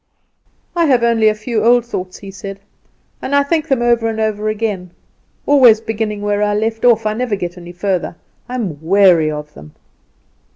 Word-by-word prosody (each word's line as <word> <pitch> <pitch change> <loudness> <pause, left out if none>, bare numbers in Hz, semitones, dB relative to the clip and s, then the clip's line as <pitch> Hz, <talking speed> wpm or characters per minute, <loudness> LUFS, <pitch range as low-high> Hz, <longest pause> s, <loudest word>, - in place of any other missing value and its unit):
"I 340 -1 +2
have 250 -4 +3
only 230 -2 +3
a 215 - +3
few 215 0 -2
old 240 +1 +4
thoughts," 185 -6 -6
he 195 -1 -10
said, 195 +1 -8 0.6
"and 280 - -2
I 285 - +4
think 315 +2 -1
them 265 -5 +1
over 235 -1 +2
and 220 -1 -3
over 215 -1 -1
again; 210 -4 -3 0.6
always 255 -6 +6
beginning 215 -2 -4
where 205 0 0
I 205 0 +1
left 225 +1 -2
off. 230 -3 +4
I 215 - 0
never 235 -1 -2
get 175 -2 -5
any 175 -1 -10
further. 180 -1 -2 0.3
I 250 - -4
am 180 - -4
weary 175 -2 +4
of 150 0 -6
them." 75 +1 -14
215 Hz, 190 wpm, -16 LUFS, 195-235 Hz, 0.6 s, always